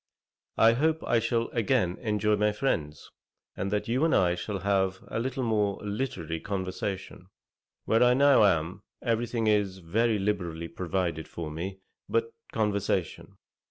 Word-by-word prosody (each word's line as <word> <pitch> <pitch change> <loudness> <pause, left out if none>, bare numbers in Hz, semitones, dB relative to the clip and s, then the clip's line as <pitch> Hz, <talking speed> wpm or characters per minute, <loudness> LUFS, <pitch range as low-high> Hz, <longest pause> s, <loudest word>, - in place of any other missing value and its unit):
I 115 +1 +6
hope 160 +6 +1
I 115 - +3
shall 115 0 0
again 110 -5 +1
enjoy 105 -1 +1
my 105 0 +1
friends, 80 - -2 0.4
and 95 - -2
that 105 +1 -1
you 125 +5 +1
and 165 - +3
I 90 -2 +3
shall 100 +2 -4
have 95 -1 0
a - - -2
little 130 +2 -2
more 105 -4 +1
literary 100 - -3
conversation. 95 0 -4 0.6
Where 115 +1 +3
I 125 0 +5
now 140 -3 +6
am, 85 0 +1 0.2
every 115 -1 0
thing 115 -2 -1
is 105 -3 +2
very 105 +6 +1
liberally 90 -5 -2
provided 85 -3 -2
for 80 -3 -6
me 95 +5 -5 0.3
but 115 0 0 0.2
conversation. 100 -5 -1
105 Hz, 150 wpm, -28 LUFS, 95-115 Hz, 0.6 s, I